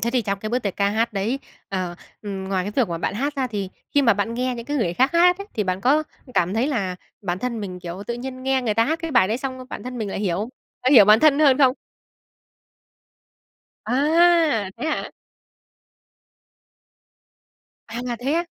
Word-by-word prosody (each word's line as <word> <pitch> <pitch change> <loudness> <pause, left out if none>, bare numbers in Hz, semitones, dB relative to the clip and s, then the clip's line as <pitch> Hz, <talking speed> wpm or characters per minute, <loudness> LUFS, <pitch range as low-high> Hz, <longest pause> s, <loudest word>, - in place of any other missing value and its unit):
Thế 235 +4 0
thì 250 -1 +1
trong 200 -1 -2
cái 215 +2 -5
bước 245 - +1
tiệc 200 -6 -4
ca 200 0 +2
hát 225 +3 0
đấy, 215 +6 -1 0.3
ờ, 185 -3 -3 0.3
ừm, 195 -2 -5
ngoài 190 -1 -1
cái 205 - -3
việc 250 -7 +3
mà 170 -1 -3
bạn 175 - -2
hát 280 +7 -2
ra 265 - 0
thì 205 -5 -4 0.3
khi 285 - +5
mà 230 -5 +5
bạn 205 +3 -2
nghe 250 +1 -1
những 235 -1 -7
cái 290 +1 -2
người 180 -10 0
khác 260 - +2
hát 355 +2 +5
ấy, 400 - -7
thì 210 - 0
bạn 185 0 -1
có 285 +8 +3 0.3
cảm 180 +3 +1
thấy 230 +4 +1
là 195 -10 -2 0.3
bản 180 -2 -2
thân 235 +1 -3
mình, 185 -3 -6
kiểu, 175 +2 -6
tự 235 - -2
nhiên 255 +1 -7
nghe 265 0 +1
người 220 -4 0
ta 225 +1 +3
hát 320 +6 -1
cái 330 - -3
bài 240 -9 +4
đấy 220 - 0
xong, 260 -1 -5
bản - - -6
thân 250 0 -6
mình 215 -3 -3
lại - - -4
hiểu 185 -5 0
không? 210 +4 -3 0.3
Bạn 255 - +3
hiểu 225 -7 +9
bản 215 +2 +6
thân 300 -2 +5
hơn 285 -3 +5
không? 260 -3 +5 2.1
À, 300 - +3
thế - - -4
hả? 315 - -2 2.8
À, 235 +2 -6 0.2
thế 265 +4 -1
á? 340 +1 +1
235 Hz, 215 wpm, -23 LUFS, 200-270 Hz, 2.8 s, hiểu